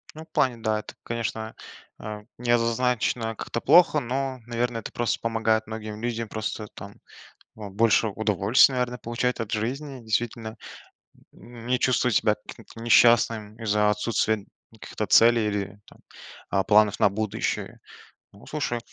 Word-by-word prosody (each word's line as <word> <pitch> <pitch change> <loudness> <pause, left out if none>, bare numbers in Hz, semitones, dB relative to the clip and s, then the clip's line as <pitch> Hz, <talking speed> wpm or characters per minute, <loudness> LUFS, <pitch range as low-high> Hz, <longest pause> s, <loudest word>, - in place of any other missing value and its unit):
Ну, 155 - -8
в - - -44
плане, 130 -3 +1
да, 110 -1 -1
это, - - -10
конечно, 115 -1 -4 0.4
э, 105 0 -7 0.2
не 120 0 -1
однозначно 115 -1 +1
как-то 115 - -5
плохо. 170 -3 +5
Но, 130 +1 -3
наверно, 120 0 -2
это 115 - -6
просто 120 -1 -1
помогает 115 -1 0
многим 110 -1 -7
людям 115 -1 -3
просто 110 0 -4
там, 100 +1 -9 0.6
э, 105 -2 -8
больше 110 +2 +3
удовольствия, 110 +4 +3
наверно, 125 -1 -1
получать 120 +3 -2
от 115 -2 -4
жизни. 130 +5 -3
Действительно, 110 0 -2 0.8
м, 120 -1 -13
не 125 0 +1
чувствовать 125 -2 +2
себя 105 -1 +3
каким-то 115 - -12
несчастным 115 -2 +4
из-за 105 -1 +2
отсутствия 105 0 0 0.3
каких-то 110 -1 -6
целей 115 -1 +5
или 100 -1 -3
там, - - -19 0.5
э, 95 - +2
планов 105 0 +4
на - - +5
будущее. 110 +1 -3 0.5
Ну, 100 - -16
слушай 135 -6 -2
115 Hz, 145 wpm, -25 LUFS, 105-120 Hz, 0.8 s, плохо